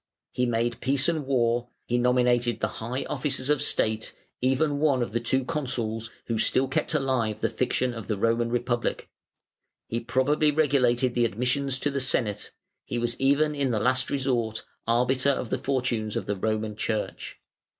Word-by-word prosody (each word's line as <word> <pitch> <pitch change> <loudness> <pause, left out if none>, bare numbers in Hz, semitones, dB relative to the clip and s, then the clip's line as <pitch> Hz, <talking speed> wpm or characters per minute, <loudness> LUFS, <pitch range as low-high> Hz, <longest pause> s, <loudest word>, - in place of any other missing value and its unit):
He 125 0 0
made 120 0 -1
peace 135 +1 +3
and 160 -5 -1
war, 120 -2 +1 0.2
he 120 +1 0
nominated 120 -1 +2
the - - +1
high 125 +4 -3
officers 135 -1 0
of 150 -2 +2
state, 110 -6 0 0.3
even 140 +3 +1
one 140 -5 +3
of 100 - -5
the 120 - 0
two 130 +3 0
Consuls, 120 -7 -2 0.2
who 115 -2 -1
still 130 +4 +2
kept 135 +4 -1
alive 130 -7 0
the - - 0
fiction 125 0 0
of 115 -4 -7
the 105 - -1
Roman 115 +3 +1
Republic; 120 0 -1 0.7
he 115 - -2
probably 140 +6 +2
regulated 130 -5 +2
the 120 -1 +2
admissions 125 +5 0
to 145 - +1
the 140 - -1
Senate; 120 -5 0 0.3
he 120 - -4
was 120 0 0
even 145 +3 +3
in 140 -2 0
the 115 -3 0
last 130 +3 +1
resort 120 -5 -1 0.2
arbiter 125 +3 +2
of 125 -4 -1
the - - 0
fortunes 125 -5 -1
of - - -2
the 105 - -1
Roman 110 +1 -2
Church. 110 0 -3
125 Hz, 170 wpm, -26 LUFS, 115-135 Hz, 0.7 s, peace